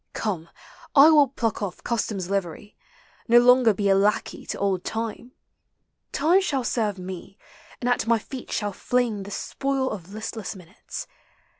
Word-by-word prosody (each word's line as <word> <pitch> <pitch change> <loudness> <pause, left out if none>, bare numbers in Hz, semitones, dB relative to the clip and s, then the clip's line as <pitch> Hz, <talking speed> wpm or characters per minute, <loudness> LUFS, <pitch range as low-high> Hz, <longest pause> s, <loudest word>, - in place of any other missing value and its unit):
Come, 175 -7 -3 0.5
I 295 +3 +9
will 295 -3 +6
pluck 235 -4 -2
olf 195 -3 -5
custom's 215 -6 -2
livery, 195 +1 -3 0.5
Nor 240 0 +7
longer 250 -1 +6
be 205 0 -1
a 195 - +5
lackey 200 +2 0
to - - -3
old 195 -2 0
Time, 230 +2 -4 0.8
Time 335 +7 +3
shall 280 -9 -1
serve 215 -3 -1
me, 185 +2 -8 0.4
and 245 - -3
at 245 -2 +1
my 230 0 +4
feet 255 +3 -8
shall 205 -2 -1
fling 240 -2 0
The 195 - -8
spoil 270 +5 -2
of 190 -2 -7
listless 220 -1 -5
minutes. 185 +1 -9
220 Hz, 155 wpm, -25 LUFS, 195-250 Hz, 0.8 s, I